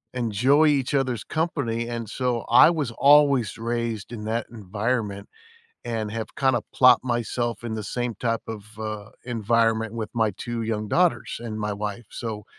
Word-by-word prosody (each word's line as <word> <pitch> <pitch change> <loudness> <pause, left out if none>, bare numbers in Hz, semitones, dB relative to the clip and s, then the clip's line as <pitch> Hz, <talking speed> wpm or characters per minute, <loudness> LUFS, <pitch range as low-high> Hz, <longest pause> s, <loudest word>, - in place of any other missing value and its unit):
enjoy 125 +6 +3
each 140 -2 +1
other's 130 -5 0
company, 135 -8 -2
and, 115 -3 -5
so, 125 -2 -1
I 125 +7 +8
was 150 -8 -1
always 140 -4 +4
raised 115 -2 -3
in 105 -3 -6
that 115 +1 -2
environment 105 -1 -3 0.6
and 110 -3 -3
have 115 -1 -5
kinda 130 -5 +2
plopped 125 0 +6
myself 120 -1 -2
in 110 -2 -3
the 110 - -4
same 120 +3 -3
type 115 0 -1
of, 110 -3 -6
uh, 110 -1 -5
environment 115 -1 +1
with 110 -2 -4
my 110 -2 +2
2 115 +4 -4
young 110 -1 -2
daughters 165 - +1
and 110 -2 -5
my 105 -1 -2
wife, 105 +2 -5
so 110 -3 -5
115 Hz, 160 wpm, -24 LUFS, 110-125 Hz, 0.6 s, I